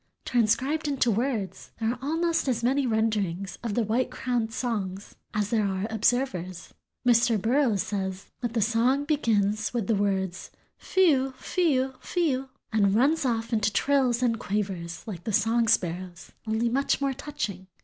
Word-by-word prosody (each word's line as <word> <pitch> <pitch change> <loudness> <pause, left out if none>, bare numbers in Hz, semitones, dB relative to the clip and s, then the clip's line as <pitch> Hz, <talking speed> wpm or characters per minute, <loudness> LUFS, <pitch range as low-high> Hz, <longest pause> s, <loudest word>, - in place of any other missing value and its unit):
Transcribed 260 +7 +1
into 270 -4 +2
words, 225 -3 -2
there 225 0 +1
are 245 - -5
almost 330 +3 0
as 240 -3 0
many 265 +2 +2
renderings 210 -5 -1
of 225 -4 -2
the 235 - +2
White 235 +4 0
crowned's 245 -3 -2
song 205 -7 -2 0.3
as 210 -1 -1
there 220 -2 +2
are 190 0 -2
observers. 200 -6 -1 0.3
Mr. 235 -2 +4
Burroughs 230 -2 +2
says 190 -2 -4
that 240 -2 -3
the 225 -3 +2
song 240 +6 +2
"begins 215 -7 +1
with 230 -4 0
the 225 - +1
words 190 -3 -1 0.3
fe 375 -3 +3
u, 265 -1 0
fe 335 +4 +1
u, 260 +1 0
fe 345 -4 0
u, 265 +1 -3 0.2
and 200 -2 +3
runs 290 +6 +3
off 230 -1 -1
into 215 -1 +2
trills 255 +1 +2
and 230 -2 +1
quavers 190 -5 -3
like 180 -6 -7
the 220 - -3
song 225 +3 +2
sparrow's, 180 -3 -1 0.2
only 220 +2 +1
much 270 +4 +1
more 275 -1 0
touching." 210 -10 -5
230 Hz, 165 wpm, -27 LUFS, 205-260 Hz, 0.3 s, Mr